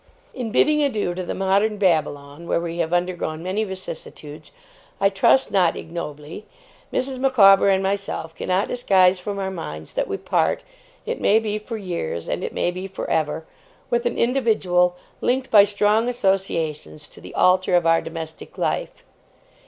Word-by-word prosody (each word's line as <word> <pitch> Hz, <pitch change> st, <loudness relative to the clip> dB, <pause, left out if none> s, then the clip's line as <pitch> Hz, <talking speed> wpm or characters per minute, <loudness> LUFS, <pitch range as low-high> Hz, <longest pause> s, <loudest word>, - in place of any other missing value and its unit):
'In 245 Hz, -3 st, -4 dB
bidding 300 Hz, +5 st, +3 dB
adieu 220 Hz, -11 st, 0 dB
to 185 Hz, -, -4 dB
the -, -, -4 dB
modern 200 Hz, +3 st, +1 dB
Babylon, 155 Hz, -4 st, -1 dB
where -, -, +1 dB
we 170 Hz, 0 st, -5 dB
have 165 Hz, -1 st, -1 dB
undergone 175 Hz, -3 st, -2 dB
many 190 Hz, +4 st, -1 dB
vicissitudes, 160 Hz, -6 st, -8 dB, 0.5 s
I 195 Hz, 0 st, +4 dB
trust 200 Hz, +7 st, +3 dB
not 180 Hz, -4 st, +3 dB
ignobly, 160 Hz, +2 st, -7 dB, 0.4 s
Mrs. 260 Hz, 0 st, -2 dB
Micawber 200 Hz, -8 st, +6 dB
and 190 Hz, 0 st, +2 dB
myself 195 Hz, -4 st, -3 dB
cannot 185 Hz, +3 st, -1 dB
disguise 190 Hz, -6 st, +3 dB
from 200 Hz, +2 st, -5 dB
our 190 Hz, -1 st, -3 dB
minds 80 Hz, -, -7 dB
that -, -, -1 dB
we -, -, -3 dB
part, -, -, 0 dB, 0.4 s
it -, -, -4 dB
may 210 Hz, -, +4 dB
be 215 Hz, -1 st, -1 dB
for 225 Hz, +2 st, -6 dB
years 170 Hz, -, -4 dB
and -, -, -3 dB
it -, -, -3 dB
may 175 Hz, -, -1 dB
be 185 Hz, +2 st, -6 dB
for 190 Hz, -, -6 dB
ever, 160 Hz, 0 st, -1 dB, 0.5 s
with 240 Hz, 0 st, +1 dB
an 240 Hz, -, -3 dB
individual 210 Hz, -8 st, +2 dB, 0.3 s
linked 260 Hz, +1 st, 0 dB
by 205 Hz, -2 st, +8 dB
strong 210 Hz, +3 st, +2 dB
associations 165 Hz, -, -2 dB
to -, -, -14 dB
the -, -, -11 dB
altar 185 Hz, 0 st, +3 dB
of 175 Hz, -1 st, +3 dB
our 165 Hz, 0 st, +4 dB
domestic 160 Hz, -1 st, -8 dB
life. -, -, -2 dB
190 Hz, 165 wpm, -22 LUFS, 170-210 Hz, 0.5 s, by